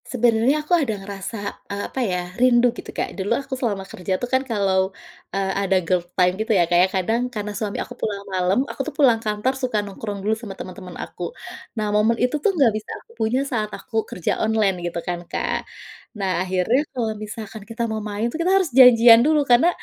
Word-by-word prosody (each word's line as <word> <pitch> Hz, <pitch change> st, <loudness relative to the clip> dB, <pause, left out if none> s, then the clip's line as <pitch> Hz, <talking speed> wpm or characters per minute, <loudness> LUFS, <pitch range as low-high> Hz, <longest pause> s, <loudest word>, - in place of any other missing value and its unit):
Sebenarnya 245 Hz, +5 st, +2 dB
aku 355 Hz, -, -1 dB
ada 225 Hz, -7 st, -1 dB
ngerasa, 200 Hz, +1 st, -6 dB
eee, 200 Hz, 0 st, -3 dB
apa 265 Hz, -, -4 dB
ya? 180 Hz, -5 st, -2 dB
Rindu 245 Hz, -1 st, +5 dB
gitu, -, -, -10 dB
Kak. -, -, -3 dB
Dulu 195 Hz, 0 st, -4 dB
aku 275 Hz, 0 st, -6 dB
selama 220 Hz, -7 st, -2 dB
kerja 185 Hz, 0 st, -3 dB
tuh 245 Hz, -, -3 dB
kan 260 Hz, -, +4 dB
kalau, 195 Hz, -6 st, +1 dB, 0.4 s
eee, 195 Hz, -1 st, -1 dB
ada 190 Hz, -1 st, +2 dB
girl 180 Hz, +1 st, +2 dB, 0.2 s
time 180 Hz, -1 st, +4 dB
gitu 220 Hz, -, -1 dB
ya, 175 Hz, -, +4 dB
kayak 175 Hz, +2 st, +4 dB
kadang 230 Hz, +7 st, 0 dB
karena 210 Hz, -3 st, -5 dB
suami 205 Hz, 0 st, -3 dB
aku -, -, -5 dB
pulang 200 Hz, -2 st, -3 dB
malam, 185 Hz, +7 st, +2 dB
aku 280 Hz, -, -5 dB
tuh 305 Hz, -, -5 dB
pulang 245 Hz, -7 st, +4 dB
kantor 215 Hz, +3 st, 0 dB
suka 250 Hz, -4 st, 0 dB
nongkrong 200 Hz, 0 st, -6 dB
dulu 215 Hz, -, +2 dB
sama 220 Hz, -4 st, -7 dB
temen-temen 185 Hz, -1 st, -9 dB
aku. 180 Hz, -, -7 dB, 0.5 s
Nah, 210 Hz, -1 st, -1 dB
momen 215 Hz, +2 st, +3 dB
itu 250 Hz, +4 st, +1 dB
tuh -, -, +4 dB
enggak 285 Hz, -, +3 dB
bisa -, -, -20 dB, 0.2 s
aku -, -, -22 dB
punya 225 Hz, +3 st, +1 dB
saat 220 Hz, -6 st, -2 dB
aku -, -, -13 dB
kerja 180 Hz, -, -2 dB
online 215 Hz, -3 st, +2 dB
gitu 170 Hz, -, -4 dB
kan, 175 Hz, -1 st, -3 dB
Kak. -, -, -2 dB, 0.5 s
Nah, 185 Hz, -3 st, 0 dB
akhirnya 190 Hz, +8 st, +1 dB
kalau 235 Hz, -4 st, -2 dB
misalkan 215 Hz, 0 st, -7 dB
kita 230 Hz, +1 st, -3 dB
mau 220 Hz, 0 st, -2 dB
main 210 Hz, +1 st, -3 dB
tuh, 330 Hz, -, -3 dB
kita 360 Hz, +2 st, +2 dB
harus 375 Hz, -4 st, +1 dB
janjian 235 Hz, -2 st, +8 dB
dulu 300 Hz, +2 st, +3 dB
karena 250 Hz, +8 st, +5 dB
215 Hz, 205 wpm, -22 LUFS, 195-245 Hz, 0.5 s, janjian